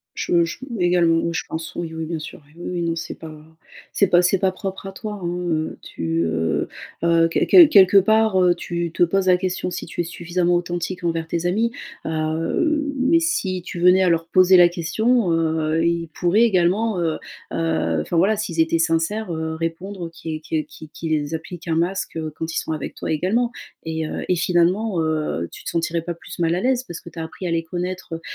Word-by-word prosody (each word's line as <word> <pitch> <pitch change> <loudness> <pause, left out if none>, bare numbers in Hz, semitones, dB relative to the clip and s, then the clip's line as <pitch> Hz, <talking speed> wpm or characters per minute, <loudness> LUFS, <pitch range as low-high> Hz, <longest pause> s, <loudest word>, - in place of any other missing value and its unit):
Je 170 -1 +2
je 165 - -5 0.2
également. 175 -2 +3
Oui, 170 0 -1
je - - -1
pense. 160 0 -5
Oui, 170 -2 -4
oui. 160 0 -4
Bien 165 0 -3
sûr. 155 +1 -9 0.2
Oui, 175 - -11
oui. 175 -1 -3
Non 165 -1 0
c'est 160 0 -5
pas 160 -1 -9 0.6
c'est 200 - +3
pas 175 -1 +4
c'est 180 +2 +3
pas 190 0 +1
propre 190 0 -6
à 195 - -6
toi, 210 +2 -6
hein. 175 -2 -3
Heu, 155 -1 -2
tu, 80 0 -2
heu 80 0 -1 0.3
heu, 165 0 +4
quel - - +1
quel 350 -5 +9
quelque 195 - +6
part, 220 0 +4
heu, 180 -1 +4
tu 170 -1 -4
te - - 0
poses 190 +2 +2
la 180 -1 +6
question 185 0 -2
si - - -5
tu - - -5
es - - -7
suffisamment 175 +1 -1
authentique 175 +1 -2
envers 165 -1 -1
tes 170 +1 -2
amis. 220 +6 +1 0.3
Heu, 165 - 0
mais 270 +6 +3
si 200 - -1
tu 175 - -7
venais 180 +2 +6
à - - +3
leur 165 -1 +1
poser 185 +1 +6
la 175 -1 +8
question, 185 +5 +1
heu, 160 0 +1
ils 170 0 0
pourraient 185 +5 +2
également, 200 0 +2
heu 165 -2 -1 0.3
heu 80 -1 0
enfin 125 - -3
voilà, 195 +6 +3
s'ils 185 -6 -2
étaient 160 +1 +2
sincères, 165 +5 0
heu, 160 0 -3
répondre 170 +2 -4
qu 160 -1 -5
que 155 0 -2
qu'ils 155 +1 -13
qu'ils 155 -2 -2
appliquent 165 +2 -7
un 165 - +1
masque, 180 +3 -1
heu, 155 -1 -4
quand 160 0 -4
ils - - 0
sont - - -3
avec 155 -3 -5
toi - - -5
également. 210 +10 +1 0.3
Et 160 -1 -3
heu, - - -5
et 180 - +2
finalement, 180 +3 +1
heu, 155 - -1
tu - - -12
te - - -3
sentirais 170 0 -1
pas 170 +1 -4
plus 170 - -11
mal 165 -1 +1
à 180 - -1
l'aise. 255 +1 +1
Parce 170 - -7
ce - - -17
que 170 - -11
tu 170 - -12
as 165 - -3
appris 175 +3 -6
à - - -2
les 165 0 0
connaître, 180 +1 -5
heu 165 - -6
170 Hz, 220 wpm, -22 LUFS, 160-185 Hz, 0.6 s, quel